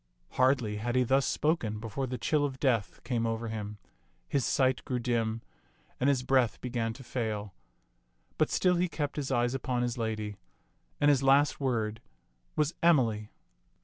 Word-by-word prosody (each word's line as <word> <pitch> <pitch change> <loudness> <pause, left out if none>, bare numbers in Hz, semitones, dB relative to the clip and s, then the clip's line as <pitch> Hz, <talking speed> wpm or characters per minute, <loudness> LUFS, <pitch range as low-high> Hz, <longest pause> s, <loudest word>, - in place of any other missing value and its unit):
Hardly 125 -5 +2
had 120 +3 -2
he 130 - +4
thus 135 +2 +2
spoken 120 -10 0
before 115 +4 -3
the 125 0 -3
chill 150 +2 +1
of 135 -2 -2
death 120 -7 0
came 115 -2 0
over 115 0 -2
him, 105 -1 -5 0.5
his 140 -3 0
sight 130 0 +2
grew 130 -3 -2
dim, 115 -2 -1 0.6
and 130 - +3
his 130 -3 +2
breath 130 -2 +2
began 120 -2 -2
to 130 - -11
fail; 110 -5 -3 0.9
but - - +3
still 180 -1 +2
he 180 +1 +1
kept 145 -3 -3
his 145 -3 -3
eyes 120 -1 +2
upon 125 -2 -1
his 120 0 -2
lady, 110 -2 -3 0.6
and 145 - +4
his 140 -2 +4
last 140 +2 +4
word 115 -5 -1 0.5
was 150 +2 +1
"Emily." 115 -11 +3
125 Hz, 165 wpm, -30 LUFS, 115-135 Hz, 0.9 s, he